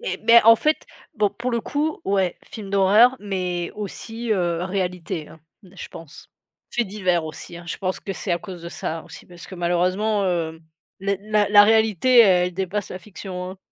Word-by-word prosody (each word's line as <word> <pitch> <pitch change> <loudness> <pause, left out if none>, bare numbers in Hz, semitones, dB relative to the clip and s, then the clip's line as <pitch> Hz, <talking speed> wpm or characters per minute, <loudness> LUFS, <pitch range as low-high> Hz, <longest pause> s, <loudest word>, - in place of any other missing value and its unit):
et - - -4
mais 235 0 +7
en 230 +1 +8
fait 305 +5 0 0.3
bon 210 -2 +2
pour 235 +5 -4
le 235 -1 0
coup, 300 +6 -2
ouais, 190 -3 0
film 205 -3 -9
d'horreur 210 +6 +5
mais 180 -4 -3
aussi, 225 +3 -6
heu, 175 -3 0
réalité, 180 -4 -3
hein, 160 - -15 0.2
je 185 -1 -11
pense. 165 -3 -13 0.4
Faits 240 -3 -1
divers 185 -5 0
aussi, 160 +2 -8
hein, 175 - -11
je - - -4
pense 185 -1 -3
que 195 - -5
c'est 185 -1 -3
à 170 - +1
cause 185 -4 -9
de 170 - -6
ça 165 -1 -5
aussi, - - -13
parce 175 -1 -13
que 190 - -10
malheureusement, 185 +4 0
heu, 165 -3 -2 0.4
les 195 0 -1
la 210 -1 +1
la 205 0 +8
réalité, 220 +2 +4
elle 180 -4 +4
dépasse 190 +2 -3
la 185 - -6
fiction, 185 -2 -7
hein. 190 - -11
190 Hz, 195 wpm, -22 LUFS, 175-215 Hz, 0.4 s, en